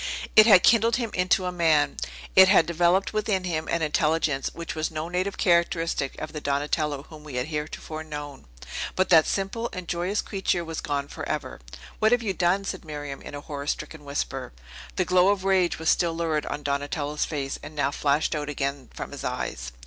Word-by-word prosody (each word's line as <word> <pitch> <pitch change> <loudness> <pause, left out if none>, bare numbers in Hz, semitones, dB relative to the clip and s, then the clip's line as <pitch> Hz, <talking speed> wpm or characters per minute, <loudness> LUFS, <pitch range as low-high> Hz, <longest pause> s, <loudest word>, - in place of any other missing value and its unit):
It 215 +1 +9
had 195 -5 +8
kindled 230 0 +5
him 235 -3 -2
into 185 +1 +2
a 180 - -1
man; 160 -4 +2 0.4
it 190 0 +9
had 190 -4 +6
developed 175 +4 +2
within 210 -3 0
him 160 -3 -2
an 170 -1 0
intelligence 150 -2 +1
which 170 -1 -6
was 155 0 -2
no 160 +1 -4
native 185 +3 -2
characteristic 170 -5 +1
of 155 - -6
the 150 - -5
Donatello 145 0 -1
whom 155 -2 -12
we 150 -4 -8
have 125 0 0
heretofore 155 +1 -5
known. 145 -2 -8 0.5
But 185 - +1
that 160 -3 +6
simple 205 +4 -2
and 185 -2 -7
joyous 180 +5 -1
creature 190 -3 -1
was 165 -1 -5
gone 140 -1 -2
forever. - - -5 0.4
"What 220 0 +4
have 245 -1 +2
you 200 -3 -1
done?" 185 +2 +1
said 190 -1 -4
Miriam, 145 -3 -6
in - - -8
a 145 - -6
horror 145 -1 -6
stricken 155 0 -4
whisper. 140 - -4 0.4
The - - +1
glow 180 0 +4
of 200 -2 +1
rage 190 -2 +2
was 160 0 +2
still 170 -2 +1
lurid 160 -3 -1
on 150 - -4
Donatello's 145 +1 -1
face, 140 -3 -4
and 155 - -10
now 145 -1 +1
flashed 145 +1 +1
out 150 -1 -3
again 140 -2 -3
from - - -6
his - - -7
eyes. 65 +1 -4
160 Hz, 195 wpm, -26 LUFS, 145-185 Hz, 0.5 s, It